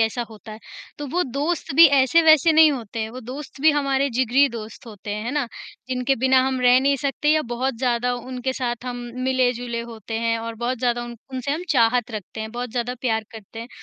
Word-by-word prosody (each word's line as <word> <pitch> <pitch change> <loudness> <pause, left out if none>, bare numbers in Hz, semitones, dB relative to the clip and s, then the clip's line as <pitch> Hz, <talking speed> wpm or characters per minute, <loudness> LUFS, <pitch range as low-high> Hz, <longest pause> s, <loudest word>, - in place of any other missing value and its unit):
ऐसा 225 +2 +1
होता 215 0 -11
है। 215 - -9 0.4
तो 290 - -5
वो 355 +7 0
दोस्त 285 +4 -2
भी 330 +2 +9
ऐसे-वैसे 315 +3 +5
नहीं 315 0 +7
होते। 225 -3 -4
वो 255 +2 -8
दोस्त 265 +3 -9
भी 315 +2 +6
हमारे 275 -2 +1
जिगरी 260 +3 +3
दोस्त 225 +1 -9
होते 210 -2 -9
हैं, 210 +1 -5
है 235 - -2
ना? 285 -4 0 0.4
जिनके 255 +1 0
बिना 260 +1 +4
हम 260 -1 -1
रह 250 0 +6
नहीं 275 +1 +2
सकते 280 +2 -1
या 310 0 +2
बहुत 260 +1 -1
ज़्यादा 245 -1 0
उनके 255 +1 -4
साथ 245 -2 -3
हम 245 -1 -4 0.3
मिले-जुले 245 -2 0
होते 225 -1 -6
हैं 230 0 0
और 230 0 -5
बहुत 240 +2 -3
ज़्यादा 240 -1 0
उन 240 0 -9 0.2
उनसे 260 +1 -3
हम 325 +4 -3
चाहत 240 -2 +2
रखते 215 0 -7
हैं, 220 - -5
बहुत 245 0 -5
ज़्यादा 245 +1 -2
प्यार 225 -3 0
करते 220 0 -11
हैं। 235 - -8
250 Hz, 215 wpm, -22 LUFS, 230-270 Hz, 0.4 s, भी